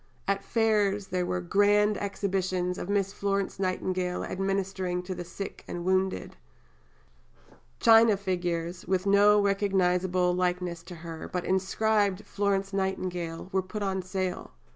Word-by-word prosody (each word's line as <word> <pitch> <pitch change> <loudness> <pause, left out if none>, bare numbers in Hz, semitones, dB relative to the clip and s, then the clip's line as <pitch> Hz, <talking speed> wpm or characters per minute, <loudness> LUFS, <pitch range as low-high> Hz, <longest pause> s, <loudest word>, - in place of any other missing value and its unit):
At 200 0 0
Fairs 210 -3 +1
there 180 -1 -1
were 180 - -1
"Grand 205 +3 +3
Exhibitions 185 -3 -2
of 180 - -5
Miss 200 -1 0
Florence 200 -1 -1
Nightingale 185 -1 -1
administering 190 -1 -2
to 185 +1 -4
the 180 -1 -6
Sick 180 +3 -7
and 175 0 -5
Wounded." 190 - 0 1.4
China 225 -2 +6
figures, 175 -3 -3
with 185 0 0
no 205 +1 +6
recognizable 185 -3 +2
likeness 180 -1 -1
to 175 +1 -10
her, 165 -1 -7
but 180 -1 -2
inscribed 200 +1 +1
"Florence 195 -1 -1
Nightingale," 185 -3 -3
were 190 - +2
put 205 +3 -5
on 190 -1 -1
sale. 185 0 -4
190 Hz, 130 wpm, -28 LUFS, 180-200 Hz, 1.4 s, China